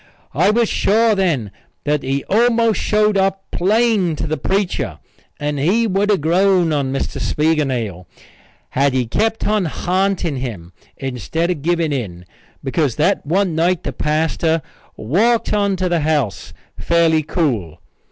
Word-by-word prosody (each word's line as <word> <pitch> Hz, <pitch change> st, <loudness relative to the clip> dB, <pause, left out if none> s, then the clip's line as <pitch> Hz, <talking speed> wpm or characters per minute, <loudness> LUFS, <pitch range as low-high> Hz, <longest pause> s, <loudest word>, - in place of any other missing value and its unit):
I 175 Hz, +7 st, +3 dB
was 230 Hz, +1 st, +2 dB
sure 225 Hz, +3 st, +2 dB
then 160 Hz, -, 0 dB, 0.3 s
that 150 Hz, 0 st, 0 dB
he 135 Hz, +1 st, -2 dB
almost 230 Hz, +1 st, +2 dB
showed 210 Hz, -1 st, +2 dB
up 195 Hz, 0 st, 0 dB
plain 205 Hz, -3 st, +2 dB
to 155 Hz, -, -3 dB
the 155 Hz, 0 st, -1 dB
preacher 195 Hz, +3 st, -2 dB, 0.4 s
and 145 Hz, -1 st, -2 dB
he 200 Hz, +11 st, +2 dB
would 200 Hz, 0 st, 0 dB
have 200 Hz, -6 st, +2 dB
grown 175 Hz, +1 st, +3 dB
on 140 Hz, -3 st, -1 dB
Mr. 135 Hz, -, -3 dB
Spiegelnail 130 Hz, -, -1 dB, 0.6 s
had 140 Hz, 0 st, +1 dB
he 130 Hz, -1 st, +1 dB
kept 220 Hz, -, -1 dB
on 210 Hz, -2 st, +1 dB
ha'nting 180 Hz, -1 st, -1 dB
him 100 Hz, -10 st, -6 dB, 0.2 s
instead 135 Hz, -, -2 dB
of 160 Hz, -5 st, -4 dB
giving 165 Hz, -1 st, 0 dB
in 90 Hz, -10 st, -5 dB, 0.4 s
because 135 Hz, -2 st, 0 dB
that 175 Hz, +7 st, +1 dB
one 185 Hz, +2 st, +1 dB
night 170 Hz, +2 st, +1 dB
the -, -, -4 dB
pastor 160 Hz, +1 st, 0 dB, 0.3 s
walked 215 Hz, -, +1 dB
on 200 Hz, -2 st, +1 dB
to 185 Hz, 0 st, -1 dB
the 175 Hz, -1 st, +1 dB
house 145 Hz, -9 st, -1 dB, 0.3 s
fairly 165 Hz, -2 st, +2 dB
cool. 120 Hz, -, -2 dB
165 Hz, 145 wpm, -18 LUFS, 140-195 Hz, 0.6 s, I